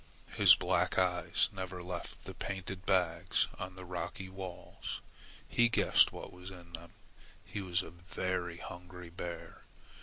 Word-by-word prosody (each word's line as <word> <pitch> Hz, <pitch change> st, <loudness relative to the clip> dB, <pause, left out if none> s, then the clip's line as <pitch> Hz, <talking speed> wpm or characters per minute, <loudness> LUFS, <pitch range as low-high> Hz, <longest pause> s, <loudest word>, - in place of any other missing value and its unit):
His -, -, +9 dB
black -, -, +1 dB
eyes 90 Hz, -1 st, +3 dB
never 95 Hz, -2 st, -5 dB
left 90 Hz, -1 st, -6 dB
the -, -, -6 dB
painted 95 Hz, 0 st, -4 dB
bags 90 Hz, -4 st, +3 dB
on 90 Hz, 0 st, -5 dB
the 95 Hz, 0 st, -7 dB
rocky 90 Hz, +1 st, -4 dB
walls. 95 Hz, -1 st, -6 dB, 0.5 s
He 120 Hz, 0 st, +4 dB
guessed -, -, +6 dB
what -, -, -8 dB
was 90 Hz, +1 st, -8 dB
in 85 Hz, -2 st, -12 dB
them. 85 Hz, 0 st, -8 dB, 0.5 s
He 100 Hz, -, -4 dB
was 90 Hz, -1 st, +1 dB
a -, -, -9 dB
very 90 Hz, 0 st, -2 dB
hungry 90 Hz, 0 st, -8 dB
bear. 85 Hz, 0 st, -6 dB
90 Hz, 145 wpm, -34 LUFS, 85-95 Hz, 0.5 s, His